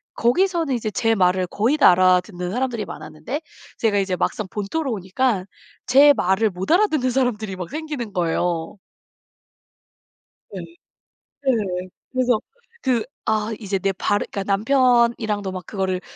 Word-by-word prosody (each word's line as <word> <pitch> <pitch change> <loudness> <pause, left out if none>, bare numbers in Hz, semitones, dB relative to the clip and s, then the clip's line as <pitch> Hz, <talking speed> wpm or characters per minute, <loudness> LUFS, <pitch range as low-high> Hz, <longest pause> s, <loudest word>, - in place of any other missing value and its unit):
거기서는 330 +4 +1
이제 225 -2 -2
제 225 +2 +1
말을 185 -1 +2
거의 225 +10 +1
다 285 - +7
알아듣는 180 0 +2
사람들이 240 -2 -2
많았는데 210 - -6 0.4
제가 215 -3 +1
이제 190 -2 0
막상 210 +3 -2
본토로 245 - -3
오니까 200 +1 -1 0.4
제 285 +3 +7
말을 190 0 +1
못 185 - -4
알아듣는 320 -8 +3
사람들이 230 -6 -1
막 180 -2 -6
생기는 295 -9 -5
거예요. 170 0 -1 1.7
네. 195 - -7 0.8
네. 195 -8 -1 0.2
그래서 250 -3 +2 0.4
그 245 -4 +1 0.3
아 215 +1 0
이제 200 -2 -2
내 195 +1 0
발음 205 +2 0
그러니까 200 - -3
남편이랑도 235 -3 +2
막 185 -1 -6
그거를 190 -3 -2
215 Hz, 295 characters per minute, -22 LUFS, 185-255 Hz, 1.7 s, 다